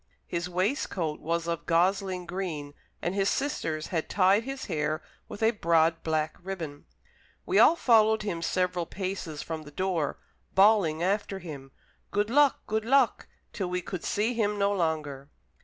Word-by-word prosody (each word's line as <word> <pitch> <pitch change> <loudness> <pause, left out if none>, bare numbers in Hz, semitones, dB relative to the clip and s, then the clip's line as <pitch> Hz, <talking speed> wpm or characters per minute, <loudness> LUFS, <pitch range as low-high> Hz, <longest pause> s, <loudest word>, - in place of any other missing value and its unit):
His 170 +1 -3
waistcoat 180 - -1
was 165 +1 -1
of 170 -1 -3
gosling 185 +1 +1
green, 170 -5 -4 0.3
and 175 - 0
his 195 0 +1
sisters 160 - -2
had 165 -3 -2
tied 200 +3 +3
his 270 0 -5
hair 155 +1 -2 0.3
with 215 - -6
a 225 - +5
broad 165 -5 +2
black 155 -1 -1
ribbon. 170 -6 -6 0.6
We - - +3
all 335 - +7
followed 220 -6 +4
him 175 -5 -3
several 180 -1 0
paces 185 -6 -4
from 160 -1 -5
the 150 - -11
door, 170 -2 -1 0.4
bawling 190 -6 +4
after 200 +1 0
him: 145 -7 -9 0.4
"Good 205 +2 0
luck, 285 0 +4
good 220 0 -1
luck!" 255 -1 +2 0.3
till 190 -3 -3
we 180 0 -2
could 185 -2 -5
see 220 +4 0
him 210 -3 0
no 200 0 +2
longer. 155 -6 -2
180 Hz, 155 wpm, -28 LUFS, 160-205 Hz, 0.6 s, all